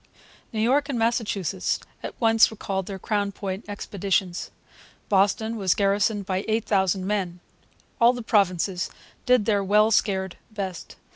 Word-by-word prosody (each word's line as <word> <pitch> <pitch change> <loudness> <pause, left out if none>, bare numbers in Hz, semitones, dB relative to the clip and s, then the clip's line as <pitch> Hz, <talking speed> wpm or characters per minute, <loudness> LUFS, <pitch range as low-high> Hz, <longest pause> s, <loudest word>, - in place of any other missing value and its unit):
New 220 - -3
York 280 +5 +2
and 265 - -1
Massachusetts 215 -5 0 0.2
at - - -7
once 225 -1 +5
recalled 195 -3 -4
their 195 - -5
Crown 200 +1 -1
Point 195 +1 -5
expeditions. 195 -3 -2 0.6
Boston 205 +3 +2
was 190 -4 +2
garrisoned 200 +1 +1
by 190 0 -1
8,000 200 -4 +1
men. 190 -4 -2 0.6
All 235 +1 +6
the 245 -1 -6
provinces 185 -4 +1 0.4
did 250 -4 +4
their 205 -2 +2
well 210 +3 +4
scared 190 -4 +1
best. 195 -5 -6
205 Hz, 135 wpm, -25 LUFS, 190-220 Hz, 0.6 s, All